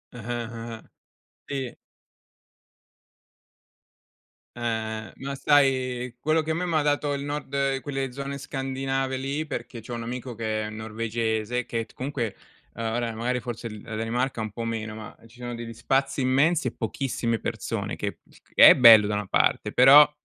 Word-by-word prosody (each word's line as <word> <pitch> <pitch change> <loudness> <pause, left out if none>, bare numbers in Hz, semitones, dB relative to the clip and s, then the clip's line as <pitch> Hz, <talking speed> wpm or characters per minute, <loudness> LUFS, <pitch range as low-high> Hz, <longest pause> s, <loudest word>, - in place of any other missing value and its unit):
Ah-ah, 120 0 -4
ah, 115 -1 -7 0.6
sì. 135 -3 -4 2.8
Eh, 120 - -9 0.5
eh. - - -15
Ma 140 +1 -5
sai 130 -4 +2
quello, 155 +4 +2
che 155 +1 -3
a - - +2
me 175 +3 -1
m'ha 165 -3 +1
dato, 145 0 +1
il 140 0 -3
nord 140 -2 -1
quelle 135 -2 -3
zone 140 +2 -5
scandinave 135 -1 -2
lì, 140 +4 -2
perché 120 -5 -6
c'ho 120 +2 -8
un 115 -1 -4
amico 125 +1 -5
che 110 -1 -2
è - - -5
norvegese 110 +2 -2
che 115 -2 -3
t - - -22
comunque, 125 -5 -3 0.4
uhm, 115 - -6
ora 115 +1 -1
magari 120 +3 -1
forse 120 -1 -6
l 105 -1 -9
la 110 - -6
Danimarca 115 +2 -1
un 110 -1 -4
po' 115 +3 -5
meno, 110 -1 -3
ma 110 -1 -9
ci 115 +2 -19
sono 120 0 -5
degli 115 0 -7
spazi 135 +4 0
immensi 140 +4 +3
e - - -1
pochissime 115 -1 -2
persone, - - -3
che - - -4 0.4
che - - +10
è - - +8
bello 115 -4 +9
da 105 - -1
una 105 -1 -3
parte, - - +2
però, 140 +4 +8
125 Hz, 165 wpm, -26 LUFS, 115-135 Hz, 2.8 s, che